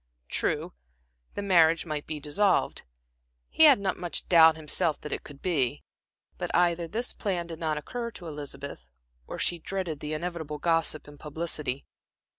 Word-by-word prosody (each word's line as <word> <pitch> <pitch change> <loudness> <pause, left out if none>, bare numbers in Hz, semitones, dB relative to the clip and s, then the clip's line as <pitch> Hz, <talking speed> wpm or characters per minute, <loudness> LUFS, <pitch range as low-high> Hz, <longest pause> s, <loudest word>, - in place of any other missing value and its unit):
True, - - -1 0.6
the 205 - -3
marriage 165 -4 +4
might 155 -3 -4
be 155 -1 -4
dissolved 180 +7 +1 0.7
he 320 - +7
had 285 -7 +8
not 195 -2 -1
much 175 -1 -2
doubt 160 -2 +7
himself 155 0 0
that 150 - -7
it - - -3
could 140 -2 -13
be; 140 -10 0 0.6
but - - -2
either 170 -1 +2
this 235 +8 -1
plan 185 -5 -2
did 165 -1 -8
not 155 -2 -1
occur 235 +10 -4
to 190 -6 -9
Elizabeth, 145 - -7 0.4
or - - -6
she 175 - +1
dreaded 175 -4 -4
the 150 +1 -4
inevitable 160 -2 -4
gossip 165 -1 +1
and 145 -1 -13
publicity. 150 -3 -3
165 Hz, 160 wpm, -28 LUFS, 150-180 Hz, 0.7 s, had